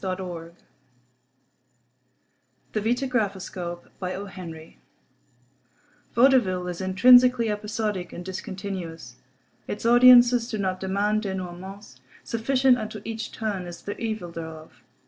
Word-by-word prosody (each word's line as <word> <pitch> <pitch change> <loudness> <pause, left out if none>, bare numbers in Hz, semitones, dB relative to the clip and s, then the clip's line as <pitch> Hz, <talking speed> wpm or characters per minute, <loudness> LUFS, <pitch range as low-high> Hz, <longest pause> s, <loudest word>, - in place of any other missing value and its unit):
XVIII 180 -3 -5 2.2
THE 215 - 0
VITAGRAPHOSCOPE 200 -8 -2 2.3
Vaudeville 230 -8 +4
is 180 +1 -5
intrinsically 245 +4 +5
episodic 210 -3 -3
and 175 - -8
discontinuous. 185 - -6 0.5
Its 210 - -5
audiences 240 0 +7
do 215 - -3
not 185 -2 -2
demand 200 +3 0
dénouements. 190 0 -7 0.2
Sufficient 255 +2 +2
unto 215 0 -6
each 225 0 -5
"turn" 205 -5 -4
is 175 - -10
the 205 - -5
evil 215 -6 -4
thereof. 160 -1 -9
200 Hz, 90 wpm, -25 LUFS, 180-230 Hz, 2.3 s, audiences